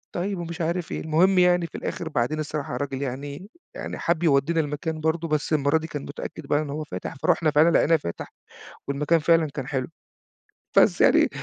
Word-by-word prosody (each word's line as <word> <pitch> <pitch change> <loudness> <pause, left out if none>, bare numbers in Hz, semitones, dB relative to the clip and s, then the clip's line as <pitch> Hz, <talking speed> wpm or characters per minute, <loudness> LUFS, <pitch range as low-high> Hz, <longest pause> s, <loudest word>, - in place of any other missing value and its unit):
"طيب." 190 +2 -2
ومش 170 0 -5
عارف 170 +1 -2
إيه. - - -3
المهم 180 +5 +3
يعني 180 -1 +4
في - - -15
الآخر 165 - -4
بعدين 150 +2 -1
الصراحة 150 -2 -4
الراجل 135 0 -3
يعني 140 +7 -5 0.3
يعني - - -5
حَب 170 0 0
يودّينا 160 +1 +3
المكان 155 +1 -2
برضه 160 +1 0
بس 150 0 -1
المرة 145 +1 +3
دي 160 0 -5
كان 150 -2 -5
متأكد 145 +1 -7
بقى 145 +1 +2
إن 150 - -5
هو 150 +2 -4
فاتح، 155 - -6
فرُحنا 155 +3 +1
فعلًا 150 +3 +5
لقيناه 165 0 +4
فاتح 85 - -5 0.5
والمكان 150 +4 +1
فعلًا 165 0 +3
كان 135 -2 -5
حلو. 130 -3 -2 0.9
بس - - +5
يعني - - +5
155 Hz, 190 wpm, -25 LUFS, 145-165 Hz, 0.9 s, فعلًا